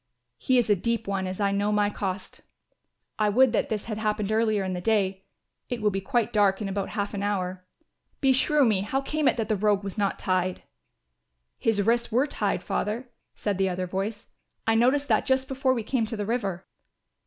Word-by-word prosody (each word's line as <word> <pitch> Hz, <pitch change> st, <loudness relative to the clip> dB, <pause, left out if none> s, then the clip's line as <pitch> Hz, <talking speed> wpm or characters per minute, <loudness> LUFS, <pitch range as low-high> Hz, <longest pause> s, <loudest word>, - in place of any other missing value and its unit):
He 255 Hz, -, +2 dB
is 240 Hz, -, +3 dB
a 205 Hz, -, +4 dB
deep 230 Hz, +4 st, -1 dB
one 195 Hz, -1 st, -1 dB
as 185 Hz, +1 st, -5 dB
I 200 Hz, -1 st, +2 dB
know 200 Hz, +1 st, 0 dB
to 210 Hz, -, +1 dB
my 205 Hz, 0 st, +2 dB
cost. 190 Hz, -2 st, -5 dB, 0.8 s
I 210 Hz, -1 st, +3 dB
would 245 Hz, +3 st, +4 dB
that -, -, +1 dB
this 215 Hz, -2 st, -2 dB
had 215 Hz, -2 st, -4 dB
happened 215 Hz, -1 st, -1 dB
earlier 215 Hz, -2 st, +2 dB
in 185 Hz, -1 st, -2 dB
the 180 Hz, -, -4 dB
day. 195 Hz, -2 st, 0 dB, 0.4 s
It 245 Hz, -, -2 dB
will 210 Hz, -1 st, +2 dB
be 195 Hz, 0 st, -2 dB
quite 240 Hz, 0 st, 0 dB
dark 200 Hz, -2 st, +3 dB
in 210 Hz, -, -3 dB
about 195 Hz, 0 st, -2 dB
half 200 Hz, 0 st, -2 dB
an 200 Hz, -, -3 dB
hour. 185 Hz, -3 st, -2 dB, 0.6 s
Beshrew 270 Hz, +2 st, +4 dB
me, 210 Hz, -5 st, +2 dB
how 265 Hz, +7 st, -1 dB
came 300 Hz, +1 st, 0 dB
it -, -, +3 dB
that 225 Hz, -2 st, -1 dB
the 215 Hz, -, +1 dB
rogue 205 Hz, 0 st, +1 dB
was 195 Hz, +1 st, -5 dB
not 200 Hz, -1 st, 0 dB
tied?" 185 Hz, -1 st, -1 dB, 1.0 s
"His 210 Hz, -3 st, +2 dB
wrists 235 Hz, +2 st, +1 dB
were 250 Hz, +5 st, +3 dB
tied, 295 Hz, -, -2 dB
Father," 235 Hz, +4 st, -2 dB, 0.3 s
said 200 Hz, -3 st, -2 dB
the 190 Hz, 0 st, +2 dB
other 185 Hz, 0 st, -2 dB
voice. 195 Hz, +4 st, -4 dB, 0.4 s
"I 225 Hz, -, +3 dB
noticed 260 Hz, +5 st, +3 dB
that -, -, +3 dB
just 265 Hz, -1 st, +2 dB
before 265 Hz, -1 st, +1 dB
we 230 Hz, -, -2 dB
came 230 Hz, -1 st, 0 dB
to 225 Hz, -, -5 dB
the 205 Hz, -, -2 dB
river." 200 Hz, -5 st, -2 dB
210 Hz, 210 wpm, -26 LUFS, 195-235 Hz, 1.0 s, a